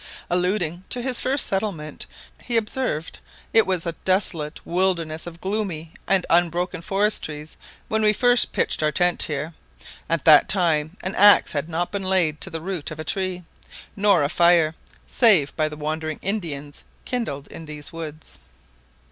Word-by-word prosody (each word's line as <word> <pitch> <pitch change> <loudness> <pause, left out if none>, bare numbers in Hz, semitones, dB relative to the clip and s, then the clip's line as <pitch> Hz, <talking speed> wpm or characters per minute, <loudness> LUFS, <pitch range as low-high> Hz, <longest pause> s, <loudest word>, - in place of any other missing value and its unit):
Alluding 180 -1 0
to 245 - -2
his 255 -1 0
first 270 +1 +2
settlement, 190 -6 -3 0.4
he 240 -2 0
observed, 215 -7 -2 0.3
"it 225 -3 +5
was 185 -3 -1
a 170 - -1
desolate 175 -5 -1
wilderness 170 -3 -1
of 170 -1 -9
gloomy 190 -6 -4
and 190 -2 +2
unbroken 175 +1 +1
forest 205 +4 0
trees 150 0 -7 0.3
when 220 0 0
we 210 -1 +4
first 245 +3 +3
pitched - - 0
our 155 0 +2
tent 175 +2 +1
here: 150 +2 -1 0.6
at 165 -3 -1
that 155 -2 +7
time 170 -3 +1
an 185 +2 -3
axe 205 +1 +7
had 150 +2 -3
not 170 +2 -2
been 200 - -3
laid 185 -5 0
to - - 0
the 165 -1 -5
root 180 -4 -3
of 155 - -9
a - - -4
tree, 185 +1 -2 0.5
nor 200 -5 +3
a 140 - 0
fire, 170 -2 +4 0.3
save 195 - +4
by 155 -1 0
the 150 - -9
wandering 155 +1 -3
Indians, 155 -8 -3 0.2
kindled 225 - -3
in 165 - -9
these 150 0 -8
woods. 155 -2 -6
175 Hz, 165 wpm, -23 LUFS, 155-195 Hz, 0.6 s, that